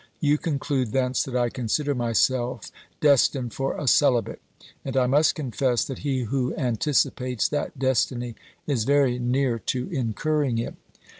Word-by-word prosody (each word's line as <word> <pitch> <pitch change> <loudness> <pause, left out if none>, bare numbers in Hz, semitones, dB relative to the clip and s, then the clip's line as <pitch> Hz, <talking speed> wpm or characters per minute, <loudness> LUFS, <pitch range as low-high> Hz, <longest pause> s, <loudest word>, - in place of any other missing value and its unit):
You 150 0 +2
conclude 140 -6 -1
thence 130 -1 +1
that 130 - -6
I 120 -1 +2
consider 140 +4 -1
myself 120 0 0 0.3
destined 135 -4 +3
for 135 0 -2
a 145 - -4
celibate, 125 -4 +3 0.4
and 135 -1 -3
I 130 - +4
must 145 +4 +3
confess 130 -3 0
that 135 - -6
he 135 -3 -1
who 125 +2 -1
anticipates 125 -2 0
that 145 0 -3
destiny 125 -2 0 0.3
is 135 -7 0
very 135 -3 +2
near 125 -1 0
to 125 +2 -2
incurring 135 - 0
it. 115 - -3
130 Hz, 145 wpm, -25 LUFS, 120-140 Hz, 0.4 s, I